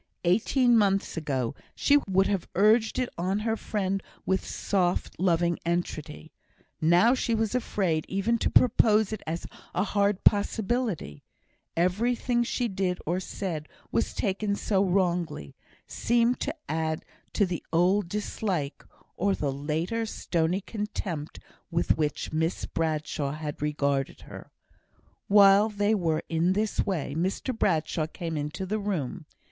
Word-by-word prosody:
Eighteen 235 +7 +3
months 195 -3 +2
ago 135 -7 -2 0.2
she 290 - +4
would 190 +1 +4
have 195 -3 -1
urged 215 +3 +4
it 255 - +1
on 185 +3 0
her 225 0 0
friend 195 -3 -2 0.2
with 190 0 +1
soft, 180 -3 -1
loving 170 -2 +2
entreaty; 165 - -3 0.5
now 175 +9 +5
she 245 -3 0
was 220 0 0
afraid 190 -10 0
even 195 +5 +1
to - - +1
propose 220 -3 +4
it 215 - -5
as 165 +2 -3 0.3
a 180 - +2
hard 200 -1 +1
possibility; 205 - +1 0.6
everything 235 +7 +1
she 240 +1 0
did 185 -3 -1
or 175 +3 0
said 170 -5 -4 0.2
was 115 - 0
taken 200 +1 0
so 200 -1 +1
wrongly 175 - 0 0.3
seemed 240 +1 +1
to 295 - -2
add 160 0 -2 0.3
to 205 - +3
the 175 -3 -4
old 180 +3 +2
dislike, 190 -7 -3 0.3
or 195 +1 +1
the 145 -2 -1
later 160 +11 -2
stony 175 -2 -1
contempt 195 -7 -5 0.3
with 170 -1 +1
which 150 0 -2
Miss 160 +2 0
Bradshaw 155 -3 -2
had 150 -1 -6
regarded 140 -2 -1
her. - - -11 0.8
While 200 +1 +6
they 205 0 +1
were 165 -6 0
in 170 +3 +2
this 210 +2 0
way 165 -8 -2
Mr 190 - -1
Bradshaw 160 -5 0
came 165 0 -5
into 150 +5 -3
the 215 +3 -1
room. 175 -6 -3
185 Hz, 135 wpm, -27 LUFS, 160-210 Hz, 0.8 s, While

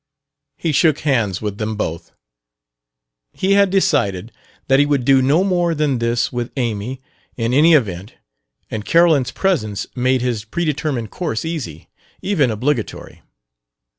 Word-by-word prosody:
He 165 - -1
shook 155 0 +2
hands 115 - 0
with 105 -1 -4
them 110 0 -2
both. 85 -5 -4 1.2
He 190 - -1
had 200 0 +4
decided 120 - +1 0.4
that 135 0 +4
he 145 - +5
would 140 -4 0
do 135 -1 +5
no 145 +8 +3
more 175 -3 +1
than 145 -4 0
this 115 +1 0
with 120 -1 -3
Amy, 120 +2 -3 0.3
in 115 0 -1
any 155 +4 +6
event, 100 - -1 0.6
and 110 -1 -4
Carolyn's 165 -3 +3
presence 110 - -1
made 130 0 +1
his 120 -4 -1
predetermined 150 -3 -2
course 160 -7 -3
easy, 140 - -5 0.3
even 160 -10 +1
obligatory. 120 +2 -3
130 Hz, 135 wpm, -19 LUFS, 110-155 Hz, 1.2 s, any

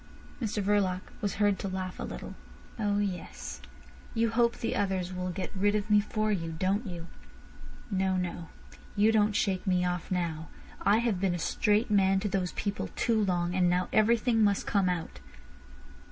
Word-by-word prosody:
Mr 215 -2 -1
Verloc 195 -2 +2 0.2
was 205 - -1
heard 205 -2 +2
to - - -3
laugh 185 -1 -4
a - - -3
little. - - -6 0.5
"Oh 205 -1 +1
yes; 180 - -4 0.5
you 230 0 +2
hope 235 0 +2
the - - -2
others 185 -2 -1
will 180 0 -3
get 185 +2 -5
rid 205 +2 +2
of 210 0 -1
me 210 - +7
for 215 +1 -1
you—don't 185 +4 -1
you? 170 -3 -6 0.9
No, 190 -1 +1
no; 175 -2 -4 0.5
you 210 +2 +4
don't 210 -1 +3
shake 195 -1 0
me 180 -1 +2
off 180 -1 -2
now. 165 -3 -2 0.3
I 205 +2 +4
have 230 -5 0
been 190 -3 +1
a - - -2
straight 210 +6 +1
man 195 -1 +4
to 210 - -1
those 185 -2 -1
people 200 -1 -3
too 225 -3 +2
long, 175 -2 0
and 180 -1 +3
now 180 +1 +1
everything 225 +1 +3
must 200 -1 +2
come 195 -3 +2
out." 165 - -3
195 Hz, 175 wpm, -29 LUFS, 180-210 Hz, 0.9 s, me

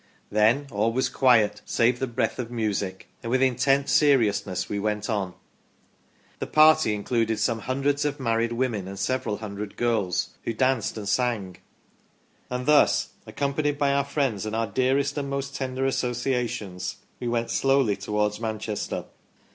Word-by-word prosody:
Then 110 +7 +3
all 105 +2 +1
was 130 +3 0
quiet 120 -6 +3
save 120 +1 +1
the 130 - -1
breath 120 +1 -1
of 120 -2 -3
music; 105 -5 -3
and 115 - -5
with 130 +2 +2
in 130 -2 +2
tent 135 +2 +2
seriousness 110 - +2
we 100 - -3
went 105 +2 -2
on 95 -4 -2 0.5
". - - -35
The - - -3
party 155 -7 +5
included 115 +1 0
some 115 0 0
hundreds 140 +5 0
of 145 0 -2
married 115 -2 0
women 120 -6 -1
and 100 +1 -7
several 105 0 -1
hundred 105 -1 -7
girls, 110 -7 0
who 115 - -2
danced 130 0 0
and 105 -2 -5
sang. 110 -5 0 0.5
" - - -38
And 125 0 -3
thus, 150 +1 +4 0.2
accompanied 145 +1 -1
by 140 -1 +2
our 140 0 +2
friends, 135 -7 -1
and 110 - -3
our 115 0 +1
dearest 135 +5 0
and 140 -1 -4
most 140 0 -3
tender 130 0 -2
associations, 120 -7 -2 0.2
we 120 - -4
went 120 -1 -1
slowly 135 -6 +2
towards 105 +1 -1
Manchester 110 -2 -3
120 Hz, 165 wpm, -25 LUFS, 105-135 Hz, 0.5 s, party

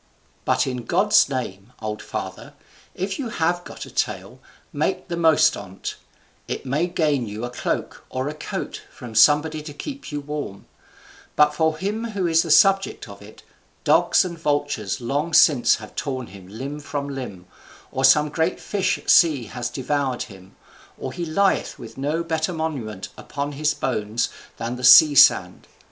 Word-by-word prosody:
But - - +2
in 125 -3 -4
God's 195 - +4
name, 120 -4 -5
old 105 -1 -5
father, - - -7 0.4
if 190 +5 -3
you 255 -5 -3
have 175 -2 0
got - - -9
a - - -13
tale, - - -3 0.3
make - - -2
the 170 - -2
most 160 -2 +4
on't, 95 -1 -7 0.5
it - - -5
may 150 +7 0
gain 150 -8 0
you 105 +3 -5
a 120 - -6
cloak 125 - -3
or 130 +1 -3
a 150 - -3
coat 155 - -6
from 120 -2 -10
somebody 150 +6 +4
to 150 -1 -9
keep 275 - -7
you 145 - -3
warm; 145 -8 -6 0.7
but 150 0 +4
for 160 0 +1
him 210 +6 -3
who 190 -3 0
is 165 -1 +4
the 165 - -5
subject 195 +1 +4
of 100 -1 -12
it, 105 +1 -14 0.4
dogs - - +4
and 170 -2 -6
vultures 145 -9 -1
long 145 +7 -1
since 140 -7 +5
have 105 -1 -11
torn 130 -3 -3
him 95 -3 -13
limb 135 +9 -6
from 145 -1 -4
limb, 125 -10 -7 0.5
or 130 - -2
some 150 +3 +5
great 160 +3 -1
fish 200 -2 -1
at - - -17
sea 155 -7 +5
has 120 +2 -5
devoured 135 -1 -2
him, 95 -3 -14 0.4
or - - -6
he 175 - -4
lieth 190 +5 +1
with 115 -1 -11
no 150 +5 -1
better 160 +1 -1
monument 135 - -4
upon 145 0 -4
his 150 +2 0
bones 110 -2 -1 0.3
than 120 +2 -4
the 125 - -9
sea 150 +4 +9
sand. 110 -10 +5
145 Hz, 170 wpm, -23 LUFS, 120-160 Hz, 0.7 s, sea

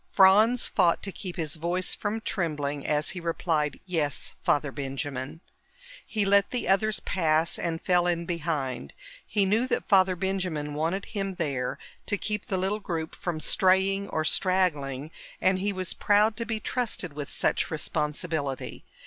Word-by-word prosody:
Franz 215 - +5
fought 170 - +2
to 195 - -2
keep 180 -1 -7
his 160 -3 -3
voice 175 +3 0
from 215 +2 -2
trembling 150 -9 -2
as 150 0 +1
he 185 - -6
replied, 165 -3 -1
"Yes, 155 -6 -1
Father 145 -1 +2
Benjamin." 140 +2 -4 0.6
He 210 -3 -1
let 200 0 +4
the 250 - -2
others 210 +3 +2
pass 160 -2 +1
and 165 -1 -2
fell 180 -1 +2
in 170 -1 0
behind. 150 - -3 0.3
He 205 -2 +1
knew 220 +6 +2
that - - -1
Father 190 -2 +5
Benjamin 180 -6 -2
wanted 165 +6 -1
him 195 -3 -3
there 140 -7 -2 0.3
to 205 - +1
keep 210 0 -3
the 190 - -1
little 195 +3 0
group 165 -5 -4
from 170 -3 -4
straying 190 +3 +2
or 155 0 -1
straggling, 155 -7 +1 0.3
and 185 0 +2
he 205 +2 +1
was 185 -2 -2
proud 210 +1 +3
to 230 - -2
be 220 -2 -1
trusted 215 - -2
with 145 -1 -6
such - - +1
responsibility. 150 -2 -2
175 Hz, 155 wpm, -27 LUFS, 150-195 Hz, 0.6 s, Franz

